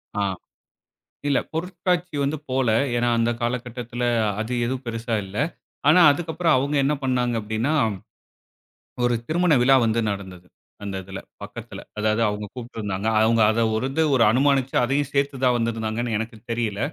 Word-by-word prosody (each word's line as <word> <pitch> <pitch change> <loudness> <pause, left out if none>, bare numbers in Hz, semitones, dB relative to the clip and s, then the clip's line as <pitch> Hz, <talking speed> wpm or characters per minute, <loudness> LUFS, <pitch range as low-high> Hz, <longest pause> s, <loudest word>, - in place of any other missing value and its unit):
ஆ, 105 - 0 1.1
இல்ல 140 - +3
பொருட்காட்சி 180 0 -2
வந்து 145 +3 -1
போல. 130 -1 +1 0.3
ஏன்னா, 120 0 +1
அந்த 115 0 +2
காலகட்டத்துல 120 0 -3 0.4
அது 110 +3 -3
எதுவும் 130 +2 -3
பெரிசா 115 0 -3
இல்ல. 95 +1 -10 0.5
ஆனா, 160 +4 +7
அதுக்கப்பறம் 160 0 +1
அவுங்க 140 +3 -1
என்ன 145 +2 +2
பண்ணாங்க 125 -2 +1
அப்பிடின்னா, 110 +6 -1 1.3
ஒரு 120 0 +2
திருமண 175 +1 +2
விழா 135 +2 +6
வந்து 115 +1 +1
நடந்தது. 95 -3 -8 0.4
அந்த 100 -1 -4
இதில 95 +1 -7 0.2
பக்கத்தில. - - -8 0.2
அதாவது 110 +1 +1
அவுங்க 105 0 -3
கூப்டுருந்தாங்க. 110 -5 -4
அவுங்க 115 +1 +3
அத 115 +1 0
ஒரு 110 - -1
இது 160 +4 +1 0.3
அனுமானுச்சு 135 +1 +2
அதையும் 140 +3 0
சேர்த்து 140 0 0
தான் 125 -1 +4
வந்திருந்தாங்கன்னு 115 0 -2
எனக்கு 110 +1 -5
தெரியல. 115 -4 -2
120 Hz, 140 wpm, -23 LUFS, 110-140 Hz, 1.3 s, ஆனா